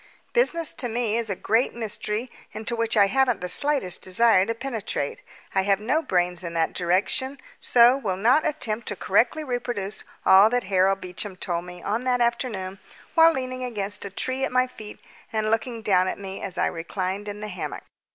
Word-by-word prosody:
Business 335 - +1
to 245 - -3
me 230 -1 0
is 230 -2 -1
a 195 - -1
great 230 +7 +1
mystery, 220 +1 -3 0.2
into 220 +2 -3
which 230 -1 0
I 205 - +7
haven't 255 +2 +2
the 180 - -4
slightest 270 -4 +1
desire 190 0 +3
to 230 - -1
penetrate. 225 - -4 0.3
I 190 - +3
have 195 0 +2
no 260 +9 +1
brains 180 - 0
in 170 -2 -6
that 165 -1 +1
direction, 205 +10 0 0.2
so 245 +2 +5
will 200 -9 -2
not 245 +10 +4
attempt 235 -7 -2
to 205 - -2
correctly 235 - +1
reproduce 240 -6 -3 0.2
all 195 +3 +7
that 245 +1 0
Harold 190 0 +2
Beecham 185 +2 -5
told 175 -1 -3
me 180 0 -10
on 220 +4 -1
that 250 -1 +1
afternoon 215 -6 -1 0.3
while 330 -1 +7
leaning 255 -3 -4
against 205 -4 -3
a 200 - -4
tree 260 +7 -3
at - - 0
my 255 0 +3
feet 215 -4 -11 0.3
and 215 -1 0
looking 225 0 -1
down 185 -3 +3
at - - -2
me 195 -1 -7
as 190 -2 -6
I - - +2
reclined 185 +4 -3
in 205 0 -5
the 210 - -5
hammock. 180 -4 -6
215 Hz, 190 wpm, -25 LUFS, 190-245 Hz, 0.3 s, I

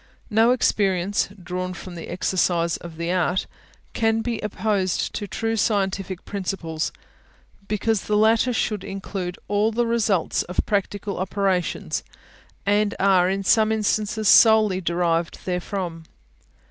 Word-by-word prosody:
No 225 +2 +4
experience, 200 -6 +1
drawn 185 +1 -4
from 180 0 -9
the 170 -2 -8
exercise 175 -2 0
of 170 -2 -10
the 170 +1 -2
art, 180 0 +1 0.5
can 225 -1 +1
be 230 -1 -2
opposed 205 -3 -1
to 205 - -4
true 225 +3 -2
scientific 195 -4 -1
principles, 180 -5 -3 0.8
because 215 0 0
the 210 - 0
latter 225 +3 +4
should 215 -4 -1
include 190 -2 -5
all 205 +2 +2
the 240 +2 +1
results 220 -7 +1
of 180 - -4
practical 205 -1 -2
operations, 190 -1 -1 0.6
and 205 +1 +2
are 185 -2 +4
in 195 +1 -1
some 220 +2 +4
instances 215 0 0
solely 215 -4 +6
derived 170 -1 0
therefrom. 180 -2 -3
195 Hz, 125 wpm, -23 LUFS, 180-215 Hz, 0.8 s, solely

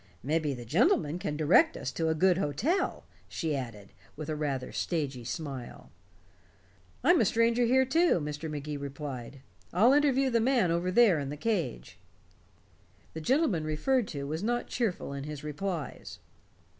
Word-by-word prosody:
"Mebbe 150 0 0
the 120 - -8
gentleman 170 - +2
can 150 -4 -3
direct 175 - +4
us - - -4
to 160 -1 -1
a 160 - +1
good 185 +2 +3
hotel," 240 - -1 0.2
she 160 -3 -2
added, 115 -7 -7 0.2
with 155 0 -6
a 155 - -1
rather 140 -4 -3
stagy 145 -7 -2
smile. 135 -1 -6 1.1
"I'm 350 -1 +5
a - - +4
stranger 230 +4 +2
here, 260 +2 +4
too," 325 - +3
Mr. 150 +1 -5
Magee 150 0 -4
replied. 140 -2 -7 0.3
"I'll 225 +9 +5
interview 275 -2 +3
the 230 - +3
man 235 -8 +2
over 170 +2 0
there 195 -4 +5
in 140 -1 -4
the 145 - -5
cage." 160 - -3 1.1
The 160 - -6
gentleman 240 - +1
referred 200 - 0
to 140 -3 -5
was 155 +4 -3
not 240 +3 -1
cheerful 210 - -2
in 140 0 -5
his 150 -1 -7
replies. 150 +1 -5
160 Hz, 155 wpm, -29 LUFS, 145-230 Hz, 1.1 s, I'm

